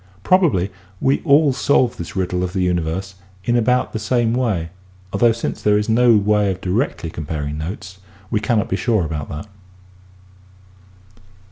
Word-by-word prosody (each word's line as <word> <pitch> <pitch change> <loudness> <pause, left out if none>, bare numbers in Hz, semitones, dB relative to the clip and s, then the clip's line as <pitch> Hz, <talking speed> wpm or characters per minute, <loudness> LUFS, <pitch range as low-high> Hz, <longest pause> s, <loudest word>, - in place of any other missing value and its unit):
Probably 145 - +3 0.3
we 135 - +1
all 145 -2 +4
solve 130 -2 +2
this 85 - -7
riddle 90 -1 -1
of 90 0 -3
the 95 -2 0
universe 90 +2 -1 0.3
in 120 - +1
about 125 +2 +1
the 110 - -2
same 115 +1 +1
way 105 -10 -1 0.4
although 115 +4 +4
since 115 +1 -4
there 105 0 +3
is 105 - -1
no 115 0 +5
way 105 0 +2
of 95 -1 -3
directly 95 - -2
comparing 75 -1 -4
notes 95 +3 -7 0.3
we 110 - +2
cannot 110 0 0
be - - -1
sure 105 -2 +1
about 75 -2 -4
that. 75 +7 -6
105 Hz, 155 wpm, -20 LUFS, 90-120 Hz, 0.4 s, no